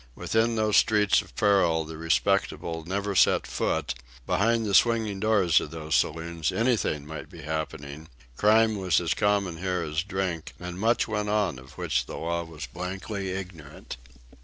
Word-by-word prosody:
Within 115 +1 +1
those 110 -1 +2
streets 105 -4 +4
of - - -17
peril 90 -7 +3
the 80 +1 -8
respectable 80 +1 0
never 100 +3 -2
set 95 - +4
foot; - - -1 0.3
behind 115 +2 +1
the 100 - -2
swinging 110 -2 +3
doors 100 -6 +3
of - - -6
those 80 -1 -5
saloons 80 +1 0
anything 115 - 0
might 80 +1 -8
be 85 -4 -11
happening, 75 0 -5 0.3
crime 110 - +4
was 95 -2 +2
as 85 -2 0
common 100 -4 0
here 90 0 -2
as 75 0 -1
drink, 95 -3 -4
and 90 0 -7
much 115 +3 +2
went 105 -2 -2
on 100 -10 0
of 65 +3 -15
which - - -1
the - - -6
law 85 +1 -2
was 80 -3 -8
blankly 95 - -5
ignorant. 90 -9 -7
90 Hz, 160 wpm, -27 LUFS, 80-105 Hz, 0.3 s, streets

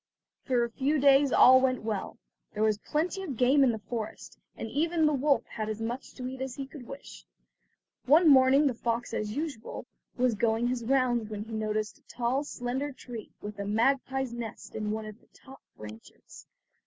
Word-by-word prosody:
For 250 -3 +1
a 235 - -2
few 280 +6 0
days 275 0 +5
all 260 +1 +7
went 255 -3 0
well; 215 0 -4 0.4
there 210 - 0
was 215 -1 +2
plenty 335 - -2
of 295 -11 -5
game 265 +4 +4
in 255 - +4
the 225 - -3
forest, 220 +1 -7 0.2
and - - -5
even 320 +6 +1
the 300 - +3
wolf 280 +1 +2
had 215 -1 -5
as 215 0 -4
much 235 +4 -5
to 250 -1 -5
eat 260 0 -7
as 265 -2 -4
he 275 - -5
could 265 -3 -12
wish. 275 0 -10 0.8
One 320 +5 +6
morning 270 +1 +6
the 270 - +2
fox 235 +1 -3
as 215 +1 -3
usual 295 -7 -5 0.3
was 250 -1 +2
going 225 +3 +1
his 250 -2 -2
rounds 240 -3 +1
when 210 -1 -5
he 225 +1 -10
noticed 215 0 -2
a - - -37
tall, 250 +4 -1
slender 265 +1 -3
tree, 245 -4 -9
with 205 0 -7
a 200 - -3
magpie's 265 +3 +1
nest 235 -3 -7
in 215 -1 -3
one 215 +1 -3
of 215 +1 -10
the - - -27
top 270 0 -15 0.2
branches. 105 +1 -12
245 Hz, 195 wpm, -29 LUFS, 220-275 Hz, 0.8 s, all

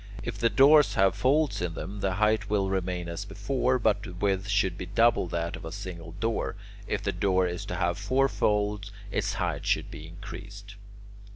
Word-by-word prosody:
If 115 -5 -5
the 115 0 +3
doors 145 +4 +6
have 95 0 +4
folds 135 - +1
in 85 -2 -2
them, 100 +2 -6
the 95 -1 0
height 105 +1 +1
will 100 -2 +1
remain 90 -2 -2
as 85 +4 -4
before, 130 +5 0
but 105 -4 +2
the 95 -5 -8
width 95 +1 0
should 100 -2 +1
be 90 - -6
double 115 0 +3
that 85 0 -2
of - - -10
a 80 - -6
single 90 -4 -7
door; 115 +5 -2 0.3
if - - -2
the - - 0
door 95 -2 +2
is 90 +3 -3
to 105 - -4
have 85 0 0
four 130 +7 +2
folds, 105 -4 0 0.2
its - - -1
height - - -2
should - - 0
be 80 - -8
increased. 100 +3 -10
100 Hz, 195 wpm, -28 LUFS, 90-105 Hz, 0.3 s, doors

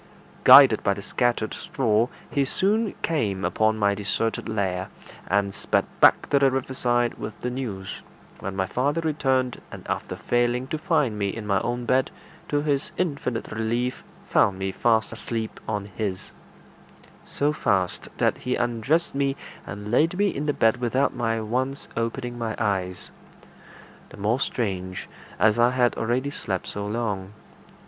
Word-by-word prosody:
Guided - - +9
by 100 - +1
the 100 - -7
scattered 120 -2 0
straw, 115 -3 +1 0.2
he 140 - +2
soon 205 +10 +1
came 105 -12 0
upon 110 0 +2
my 100 -1 +3
deserted 105 +3 -2
lair, 95 -4 -1 0.4
and 100 +1 +1
sped - - 0
back - - +6
to 140 - +5
the 135 -1 +5
riverside 125 -2 0
with 105 - -6
the 125 - -2
news, 105 -7 -5 0.4
when 95 0 -5
my 95 -1 0
father 140 - 0
returned, 130 -5 0
and - - -10
after - - -3
failing 120 +1 0
to 155 - -2
find 120 -8 +1
me 100 -1 0
in 110 +2 -5
my 100 -1 +2
own 120 0 -2
bed, 130 +2 +2 0.4
to 145 0 +1
his 145 -2 0
infinite 140 -9 -2
relief 115 +3 -1 0.2
found 95 - +3
me 95 0 -2
fast 110 +2 +1
asleep 115 -2 -4
on 105 -2 -2
his; 100 -1 -4 0.9
so 145 +1 0
fast, 95 -11 0
that - - +1
he 125 +1 -1
undressed 120 +8 0
me 140 0 0 0.3
and 105 +2 -6
laid 165 +8 +3
me 205 0 +3
in 150 -2 -3
the - - +3
bed 115 -3 +3
without 125 +3 +1
my 115 -2 0
once 130 +5 -2
opening 120 +1 -3
my 110 -2 -2
eyes 95 -4 -2 1.0
the - - -13
more 105 +5 +1
strange, 95 -8 -2 0.3
as 110 +1 +3
I 120 +1 +6
had 125 -1 +2
already 125 +5 -1
slept 95 -9 -3
so 100 0 -4
long. 105 -3 -3
120 Hz, 155 wpm, -25 LUFS, 105-130 Hz, 1.0 s, Guided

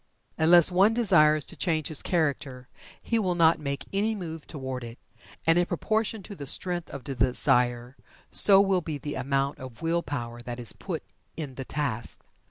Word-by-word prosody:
Unless 170 +2 +5
one 195 +5 +4
desires 155 - +5
to - - -3
change 160 -4 -1
his 155 - +4
character 140 -6 -2 0.3
he 230 - -1
will 185 -4 0
not 165 -1 +4
make 140 -2 -4
any 215 +3 0
move 165 -5 -7
toward 130 -4 -6
it. 115 +1 -9 0.5
And 165 +1 +4
in 175 - +1
proportion 215 +3 -2
to 200 - -9
the 140 -5 -8
strength 175 +4 0
of 140 - -8
the 140 - -5
desire, 125 -1 +1 0.4
so 195 -1 +6
will 195 -2 +1
be 155 -3 -5
the 145 +1 -6
amount 140 +1 -1
of 130 +1 -10
will 170 +1 +1
power 120 -6 -6
that 120 0 -7
is 120 - -2
put - - -6 0.3
in 150 -5 -5
the 135 +1 -7
task. 130 -6 -3
155 Hz, 180 wpm, -27 LUFS, 130-175 Hz, 0.5 s, so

